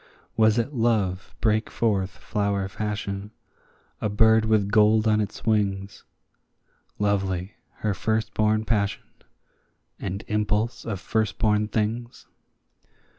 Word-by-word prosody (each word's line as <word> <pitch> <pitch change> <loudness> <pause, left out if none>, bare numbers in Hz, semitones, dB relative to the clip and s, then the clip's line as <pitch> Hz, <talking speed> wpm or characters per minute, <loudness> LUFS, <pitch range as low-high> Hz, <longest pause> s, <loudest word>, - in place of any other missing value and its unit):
Was 110 0 +4
it 120 +5 -1
Love 105 -6 0
brake 110 -1 +1
forth 100 -5 0
flower 100 +1 -2
fashion, 100 0 -4 0.7
a 105 - 0
bird 110 +1 +4
with 105 -2 +2
gold 110 0 +4
on 110 0 +3
his 105 - -4
wings, 100 -3 -1 0.9
Lovely, 95 -2 -1 0.3
her 105 - +2
firstborn 110 +1 0
passion, 100 -3 0 1.0
and 100 +2 -4
impulse 105 +2 -1
of 105 -5 -3
firstborn 105 +1 +1
things? 115 +3 -3
105 Hz, 105 wpm, -25 LUFS, 100-110 Hz, 1.0 s, Was